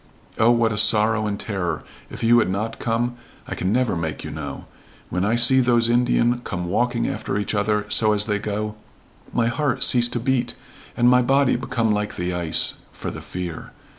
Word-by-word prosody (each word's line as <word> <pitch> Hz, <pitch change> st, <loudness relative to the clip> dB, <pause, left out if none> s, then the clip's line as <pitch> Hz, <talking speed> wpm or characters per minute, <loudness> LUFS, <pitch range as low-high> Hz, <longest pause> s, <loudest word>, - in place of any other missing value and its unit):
Oh, 115 Hz, -, +5 dB
what 115 Hz, -1 st, +3 dB
a 105 Hz, -, -1 dB
sorrow 110 Hz, 0 st, +3 dB
and 100 Hz, -1 st, -3 dB
terror 90 Hz, -6 st, -3 dB, 0.3 s
if -, -, -8 dB
you 120 Hz, +1 st, +5 dB
had 110 Hz, -, +1 dB
not 110 Hz, +4 st, -3 dB
come 120 Hz, +1 st, -1 dB, 0.3 s
I -, -, -4 dB
can 95 Hz, -, -2 dB
never 125 Hz, -3 st, +1 dB
make 80 Hz, -2 st, -4 dB
you -, -, -6 dB
know. -, -, -7 dB, 0.5 s
When 90 Hz, +1 st, -1 dB
I 110 Hz, +3 st, +1 dB
see 120 Hz, +2 st, +6 dB
those 120 Hz, -2 st, +3 dB
Indian 120 Hz, 0 st, +2 dB
come 90 Hz, -7 st, -5 dB
walking 120 Hz, +6 st, 0 dB
after -, -, -3 dB
each 100 Hz, 0 st, -2 dB
other 105 Hz, 0 st, 0 dB
so 110 Hz, 0 st, +2 dB
as 105 Hz, 0 st, +2 dB
they 105 Hz, -1 st, -1 dB
go 105 Hz, 0 st, -3 dB, 0.6 s
my 120 Hz, -, +1 dB
heart 135 Hz, +3 st, 0 dB
cease 120 Hz, -1 st, +4 dB
to 120 Hz, -, -3 dB
beat 125 Hz, 0 st, -1 dB, 0.4 s
and 120 Hz, 0 st, +3 dB
my 125 Hz, 0 st, +5 dB
body 135 Hz, +2 st, +2 dB
become 115 Hz, -2 st, -1 dB
like 105 Hz, 0 st, -2 dB
the 90 Hz, +1 st, -3 dB
ice 85 Hz, -2 st, +3 dB
for -, -, -6 dB
the -, -, -8 dB
fear. 90 Hz, -3 st, -7 dB
110 Hz, 195 wpm, -22 LUFS, 105-120 Hz, 0.6 s, see